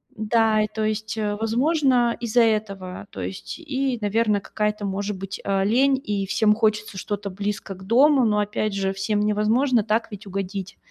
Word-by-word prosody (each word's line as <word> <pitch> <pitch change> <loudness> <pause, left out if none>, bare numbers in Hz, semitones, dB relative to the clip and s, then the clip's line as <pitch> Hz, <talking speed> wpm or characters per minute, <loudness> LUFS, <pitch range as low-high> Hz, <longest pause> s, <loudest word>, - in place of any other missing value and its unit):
Да. 220 0 +2
И, 215 - +1
то 215 +1 -4
есть, 215 +1 -2
э, 210 -1 -1
возможно, 245 +2 +2
из-за 235 +1 +2
этого, 200 -4 -2
то - - -7
есть, 195 - -6
и, 275 -5 -2
наверно, 210 0 +1
какая-то, 210 +1 -2
может 200 +1 -3
быть, 195 0 -6
а, 195 -1 +1
лень, 260 +6 +3
и 200 -2 -1
всем 210 +2 +3
хочется 215 -2 0
что-то 205 0 -4
близко 200 0 -4
к 190 - -13
дому. 270 +4 +5
Но 210 -1 +2
опять 210 0 -1
же, 195 -1 0
всем 205 +2 -1
невозможно 215 +4 +2
так 225 +1 0
ведь 205 0 -9
угодить. 195 0 -5
210 Hz, 175 wpm, -23 LUFS, 200-230 Hz, -, дому